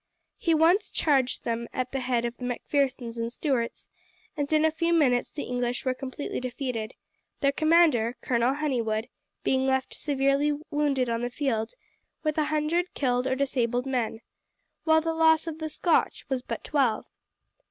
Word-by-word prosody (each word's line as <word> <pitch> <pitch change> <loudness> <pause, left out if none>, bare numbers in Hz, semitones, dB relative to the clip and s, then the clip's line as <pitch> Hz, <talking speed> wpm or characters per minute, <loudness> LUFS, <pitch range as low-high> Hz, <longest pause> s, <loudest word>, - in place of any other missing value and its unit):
He 335 - +2
at - - +4
once 340 +6 +4
charged 270 -5 +1
them 235 0 -2
at 255 0 -2
the 270 - -2
head 245 -2 0
of 235 0 -3
the - - -9
Macphersons 250 -1 -1
and 230 0 -2
Stuarts, 250 -4 -2 0.5
and 290 -1 -2
in 310 0 +4
a 315 - +3
few 335 +2 0
minutes 255 -7 +3
the 295 - -5
English 245 0 -2
were 255 - +2
completely 270 +2 -5
defeated, 250 -3 -4 0.5
their 275 -1 +4
commander, 310 -7 +3
Colonel 245 +2 +1
Honeywood, 235 -7 -1 0.3
being 265 0 +2
left 265 0 0
severely 285 +1 +1
wounded 285 -4 +1
on 230 0 -1
the 245 - -1
field, 240 -4 -2 0.5
with 305 0 0
a 305 - +2
hundred 310 +4 0
killed 250 -2 +1
or 260 - +1
disabled 250 -2 0
men, 240 -4 -2 0.6
while 320 0 +5
the 325 0 -1
loss 320 0 +4
of 320 -1 -5
the 315 -1 -3
Scotch 330 +2 +1
was 265 -2 -1
but - - -5
twelve. 265 -7 +1
265 Hz, 170 wpm, -27 LUFS, 245-305 Hz, 0.6 s, while